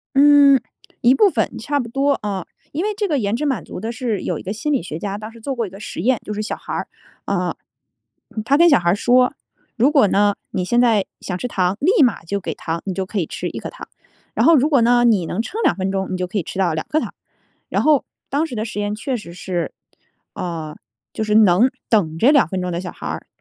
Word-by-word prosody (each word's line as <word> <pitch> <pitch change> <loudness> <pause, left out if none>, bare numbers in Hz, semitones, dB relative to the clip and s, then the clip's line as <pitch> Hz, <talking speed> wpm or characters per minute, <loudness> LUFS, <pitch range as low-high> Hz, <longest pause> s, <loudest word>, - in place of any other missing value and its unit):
嗯， 285 -1 +7 0.4
一 245 +2 +6
部 400 +7 +5
分 - - -1
差 290 -1 -1
不 240 - -3
多 275 +4 +1
啊， 195 -4 -3 0.3
因 325 +7 -2
为 425 - -1
这 415 -1 0
个 300 -6 0
延 205 0 0
迟 300 +4 -2
满 255 -11 -1
足 - - -8
的 225 +2 -4
是 235 -5 -2
有 - - -2
一 - - -9
个 195 - -4
心 300 +8 -2
理 275 - +1
学 160 -2 -6
家 200 +3 -4
当 215 +1 -8
时 230 0 -15
做 270 +4 -3
过 235 -3 -2
一 - - -10
个 195 - -11
实 210 - -6
验， 245 +5 +2
就 210 - -5
是 215 - -3
小 215 - -3
孩 - - -8
儿， - - -3 0.4
呃， - - -1 0.9
他 275 +5 +3
跟 340 +2 +6
小 285 - +6
孩 175 0 +2
儿 - - +3
说： 250 +3 +3 0.4
“如 255 +5 +4
果 275 -9 +5
呢， 205 +1 +3 0.2
你 185 - -2
现 240 +6 +2
在 225 -5 +3
想 180 - -4
吃 250 - -3
糖， 185 -4 0
立 355 - +4
马 235 -9 +2
就 200 +4 -2
给 - - -4
糖， 165 0 -4
你 195 - -1
就 190 0 -3
可 200 +1 -2
以 165 - -1
吃 - - -4
1 - - -6
颗 - - -6
糖。 - - -11 0.5
然 - - +2
后 330 -1 +7
如 285 +3 +3
果 280 -5 +4
呢， 240 +1 +4
你 210 -8 +3
能 185 +6 -3
撑 430 - -5
2 345 - +3
分 190 0 -2
钟， 190 0 -2
你 185 - -1
就 180 0 -2
可 190 +4 -3
以 - - 0
吃 175 - -8
到 175 -4 +2
2 155 - -3
颗 310 - +1
糖。” - - -6 0.6
然 - - +1
后 300 -3 +4 0.2
当 295 +4 0
时 250 -7 -7
的 215 - -1
实 210 -2 -5
验 205 0 -1
确 255 +3 -2
实 190 -7 -9
是， 175 -1 -3 0.6
啊， 160 -3 -5 0.4
就 - - -4
是 210 -1 0
能 215 +3 +5 0.2
等 165 -8 +1
着 260 - +5
2 280 - +4
分 185 +1 -3
钟 180 0 -3
的 170 - -2
小 180 - -6
孩 - - -10
儿 - - -5
220 Hz, 270 characters per minute, -20 LUFS, 185-270 Hz, 0.9 s, 嗯